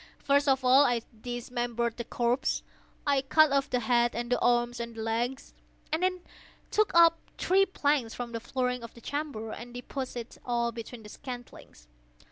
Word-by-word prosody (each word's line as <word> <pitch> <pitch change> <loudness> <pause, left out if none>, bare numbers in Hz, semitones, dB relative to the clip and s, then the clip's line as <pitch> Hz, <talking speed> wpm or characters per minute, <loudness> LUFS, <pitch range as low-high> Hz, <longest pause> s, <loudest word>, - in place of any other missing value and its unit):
First 285 +1 +2
of 265 -1 +3
all 260 +3 +7
I 245 -4 +1 0.2
dismembered 240 -1 -2
the 235 - -3
corpse. 240 +2 0 0.4
I 280 -2 +3
cut 310 +2 +5
off 275 +1 +2
the 250 -2 0
head 240 +1 +2
and 240 +1 -3
the 245 - +3
arms 240 0 +2
and 235 -1 -5
the 220 - -4
legs. 235 +4 -2 0.4
I 315 - +2
then 365 0 0 0.5
took 430 0 +3
up 335 -1 +7 0.2
three 390 +1 +3
planks 285 -9 0
from 245 -1 -5
the 230 - -3
flooring 250 +1 -2
of 230 -1 -10
the 235 - -13
chamber, 280 -6 -4
and 240 +2 -8
deposited 245 -1 -6
all 235 -1 0
between 230 0 -8
the 210 - -11
scantlings. 245 - -10
245 Hz, 175 wpm, -29 LUFS, 235-280 Hz, 0.5 s, all